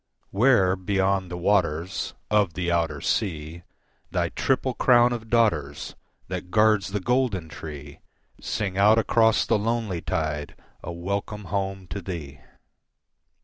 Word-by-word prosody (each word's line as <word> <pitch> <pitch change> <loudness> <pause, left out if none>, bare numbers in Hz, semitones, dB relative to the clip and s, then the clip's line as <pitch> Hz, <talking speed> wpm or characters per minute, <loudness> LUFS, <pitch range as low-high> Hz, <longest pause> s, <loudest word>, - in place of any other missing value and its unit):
Where, 100 -4 +4
beyond 95 -1 0
the 90 - -5
waters 90 -2 0 0.2
Of 105 -6 +2
the 90 -1 -1
outer 80 -4 0
sea, 80 -4 -2 0.5
Thy - - 0
triple 130 -1 0
crown 120 0 +4
of 115 -2 -6
daughters 85 -12 +1 0.3
That 90 0 -5
guards 105 0 +3
the 105 +1 -2
golden 115 -6 0
tree 75 -3 -9 0.4
Sing 95 -2 -3
out 105 +3 +6
across 115 0 +3
the - - +2
lonely 110 -5 -1
tide 75 -2 -3 0.3
A 85 - -6
welcome 100 +4 -4
home 95 -1 -2
to 100 - -4
thee. 80 -7 -7
95 Hz, 130 wpm, -25 LUFS, 85-110 Hz, 0.5 s, out